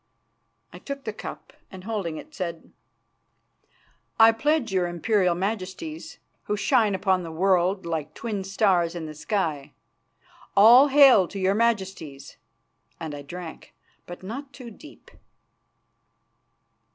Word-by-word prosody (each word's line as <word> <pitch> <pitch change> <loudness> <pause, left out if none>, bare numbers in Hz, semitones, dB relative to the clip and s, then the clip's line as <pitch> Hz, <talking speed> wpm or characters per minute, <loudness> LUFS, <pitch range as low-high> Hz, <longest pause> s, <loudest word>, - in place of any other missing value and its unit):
I - - -10
took 280 -1 -7
the 220 - -5
cup - - -9 0.2
and 190 -2 -11
holding 195 -7 -4
it, 310 - -11
said: 170 -3 -6 1.5
"I 225 0 +8
pledge 265 +1 0
your 180 -2 +1
Imperial 180 +1 +1
Majesties, 215 - -5 0.3
who 210 - -2
shine 210 -1 +2
upon 190 -1 +1
the 165 -2 -7
world 185 +2 +1
like 160 -3 -4
twin 210 -4 -4
stars 190 -3 +1
in 170 -2 -5
the 155 - -7
sky. 155 -3 -3 0.8
All 240 +7 +8
hail 270 -9 +6
to 200 - -9
your 190 0 +1
Majesties!" 190 -10 -2 0.6
and 160 -2 -6
I 145 - -7
drank, 165 +3 -10 0.3
but 175 +1 -10
not 270 +8 -7
too 245 -3 -10
deep. 300 +8 -16
195 Hz, 125 wpm, -25 LUFS, 175-225 Hz, 1.5 s, I